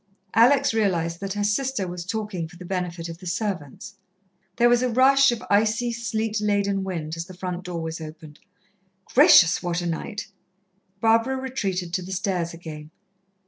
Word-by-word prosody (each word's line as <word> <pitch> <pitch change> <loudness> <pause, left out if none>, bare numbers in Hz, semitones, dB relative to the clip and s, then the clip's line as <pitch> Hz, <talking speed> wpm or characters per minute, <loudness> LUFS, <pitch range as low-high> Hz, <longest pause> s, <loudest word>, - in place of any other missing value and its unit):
Alex 260 +3 +5
realized 170 -6 0
that 195 -1 -4
her 205 0 -2
sister 215 -1 0
was 175 0 -6
talking 205 -4 -4
for 180 - -16
the 180 +1 -10
benefit 175 -2 -3
of 165 0 -8
the 185 - -9
servants. 175 - -4 0.6
There 240 0 +4
was 240 0 +4
a 255 - +1
rush 270 +2 +5
of 235 - -4
icy, 220 +3 +2
sleet 225 -1 -2
laden 200 -2 +1
wind, 165 -4 -4
as 165 0 -5
the 185 - -12
front 180 0 -5
door 170 -2 -4
was 160 0 -5
opened. 155 -1 -10 0.7
"Gracious, 240 - +6
what 175 -1 -1
a 175 - -4
night!" 205 +7 -4 0.7
Barbara 230 +3 +3
retreated 195 -10 -3
to 185 - 0
the 185 +2 -6
stairs 180 -3 -1
again. 155 -3 -9
190 Hz, 170 wpm, -24 LUFS, 170-225 Hz, 0.7 s, Gracious